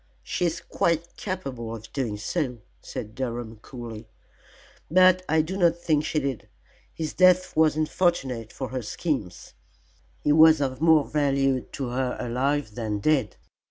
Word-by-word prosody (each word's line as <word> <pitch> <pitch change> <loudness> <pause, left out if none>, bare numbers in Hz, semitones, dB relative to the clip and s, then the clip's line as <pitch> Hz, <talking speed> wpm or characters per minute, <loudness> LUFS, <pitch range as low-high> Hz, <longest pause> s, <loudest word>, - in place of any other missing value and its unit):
"She 180 - -1
is 170 +1 -1
quite 170 -1 -1
capable 135 - -5
of 110 0 -12
doing 125 -7 -2
so," 125 +3 -2 0.2
said 110 - -7
Durham, 120 -2 -4
coolly, 115 -1 -9 0.8
"but 185 +1 +5
I 160 0 +3
do 180 +4 -5
not 170 -3 +4
think 155 -3 +1
she 155 - -2
did. 135 -4 -4 0.4
His 160 -2 -4
death 185 0 +4
was 155 -1 +4
unfortunate 150 - 0
for 130 - -5
her 130 0 -3
schemes; 110 - -4 0.7
he 150 - +3
was 160 0 +7
of 135 -1 -2
more 160 -3 +5
value 135 -3 +1
to 135 -3 -3
her 125 0 -2
alive 130 0 -1
than 110 -2 -3
dead. 130 0 +1
140 Hz, 150 wpm, -25 LUFS, 120-160 Hz, 0.8 s, was